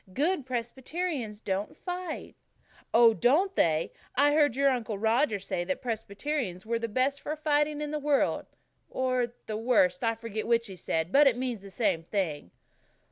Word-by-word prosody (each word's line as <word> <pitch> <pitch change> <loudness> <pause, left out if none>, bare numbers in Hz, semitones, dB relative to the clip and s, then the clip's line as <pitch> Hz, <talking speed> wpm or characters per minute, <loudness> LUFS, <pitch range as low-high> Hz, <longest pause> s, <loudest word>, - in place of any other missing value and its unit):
"Good 300 -1 0
Presbyterians 255 -1 -3
don't 195 0 -3
fight." 360 -2 -5 0.6
"Oh, 230 0 +7
don't 300 - +3
they! 160 - +1 0.2
I 290 +3 +4
heard 295 -5 +3
your 275 +1 +4
Uncle 230 -5 -2
Roger 225 +2 +2
say 185 -2 -3
that 280 - -2
Presbyterians 220 -2 -3
were 230 +1 -1
the 230 - -2
best 260 +5 0
for 305 - -3
fighting 300 -1 +1
in 295 -1 -3
the 305 - -2
world 290 -1 +1 0.4
or 255 -2 -1
the 215 - -3
worst, 215 -6 +2
I 230 0 +2
forget 220 -1 -5
which 230 0 +2
he 195 -4 -9
said, 165 -1 -2
but 285 +4 +6
it 245 -3 +3
means 250 -5 -3
the 200 - -11
same 195 -5 0
thing." 165 - -3
240 Hz, 170 wpm, -29 LUFS, 210-290 Hz, 0.6 s, Oh